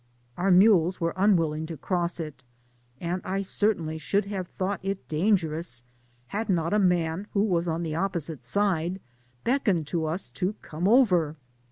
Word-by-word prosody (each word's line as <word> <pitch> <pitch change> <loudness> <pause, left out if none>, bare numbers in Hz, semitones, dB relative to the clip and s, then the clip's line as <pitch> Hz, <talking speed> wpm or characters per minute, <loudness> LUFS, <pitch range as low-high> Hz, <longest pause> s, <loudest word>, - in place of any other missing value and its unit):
Our 185 +2 0
mules 185 -2 +5
wereunwil 175 -1 +2
ling 155 +1 -4
to 165 -1 -6
cross 175 +3 -1
it, 155 -5 -6 0.6
and 175 +2 -2
I 195 +1 -1
certainly 185 -5 0
should 200 +7 0
have 195 -3 -4
thought 190 +2 -3
it 195 0 -4
dangerous, 160 - +1 0.5
had 215 +2 -3
not 170 -1 +1
a 210 - +4
man 180 0 +1
who 200 - +3
was 175 -5 +1
on 165 +1 -1
the 160 - -3
oppo 185 +2 0
site 155 -2 -6
side 190 -3 0 0.4
beckoned 220 - +1
to 170 +3 -2
u^ 160 -4 -3
to 180 - -1
come 165 +4 -2
over. 185 - +4
180 Hz, 165 wpm, -27 LUFS, 160-195 Hz, 0.6 s, mules